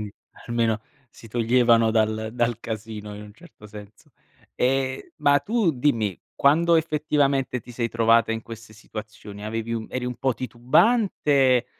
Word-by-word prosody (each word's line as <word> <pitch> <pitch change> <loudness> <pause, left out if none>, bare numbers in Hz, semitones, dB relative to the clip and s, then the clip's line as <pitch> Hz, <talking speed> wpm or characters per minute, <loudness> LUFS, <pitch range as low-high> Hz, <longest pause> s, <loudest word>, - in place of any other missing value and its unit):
quind 105 -1 -6 0.4
almeno 115 -2 0 0.3
si 115 - -15
toglievano 115 0 +3
dal 110 0 0
dal 120 -1 0
casino 105 -1 -7
in 105 - -9
un 105 0 -12
certo 165 -10 -16
senso. 105 0 -13 0.4
Ehm, 130 +1 -1
ma 145 -2 +4
tu 210 -1 +1
dimmi: 115 - 0 0.2
quando 165 +4 +4
effettivamente 145 -5 0
ti 120 - -14
sei 120 -1 -2
trovata 115 0 +3
in 110 - -3
queste 115 -1 -11
situazioni 105 -1 -10
avevi 115 +1 -3
un 110 -1 -4
eri 125 -1 -3
un 125 - -3
po' 130 - 0
titubante 130 - +2
115 Hz, 150 wpm, -24 LUFS, 110-135 Hz, 0.4 s, ma